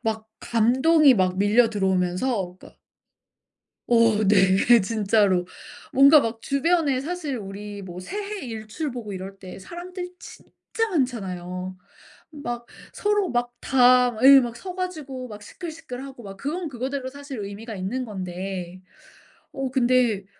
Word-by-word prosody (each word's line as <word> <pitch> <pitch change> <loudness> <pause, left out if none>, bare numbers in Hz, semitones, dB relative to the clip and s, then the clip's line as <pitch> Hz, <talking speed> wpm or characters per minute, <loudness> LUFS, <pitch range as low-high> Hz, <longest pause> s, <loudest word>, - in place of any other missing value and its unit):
막 220 -1 -3
감동이 260 +6 +4
막 185 -1 +1
밀려들어오면서 195 -2 +1
그러니까 - - -16 1.1
어 230 -3 +4
네. 195 +4 +5
진짜로. 200 -3 +2 0.5
뭔가 280 +3 +7
막 225 -2 -3
주변에 280 -1 +1
사실 310 -3 -4
우리 205 0 -7
뭐 180 -1 -8
새해 410 - -5
일출 225 +7 -5
보고 230 -4 -6
이럴 195 +1 -7
때 185 -1 -10
사람들 355 - -7
진짜 - - -13 0.4
많잖아요. 185 - -3 0.5
막 240 -6 -6 0.3
서로 415 -3 0
막 240 0 -1
다 250 -1 +5
막 220 +1 -8
으이 270 0 +9
막 240 -2 -3
서 365 +7 -7
가지고 295 -9 -5
막 210 -1 -10
시끌시끌하고 275 - -8
막, 195 -1 -9
그건 315 - -3
그거대로 260 +1 -4
사실 280 -2 -8
의미가 205 +3 -7
있는 210 +7 -3
건데 185 -2 -6 0.7
어 270 -2 -4
근데 245 -6 +2
240 Hz, 260 characters per minute, -24 LUFS, 200-275 Hz, 1.1 s, 으이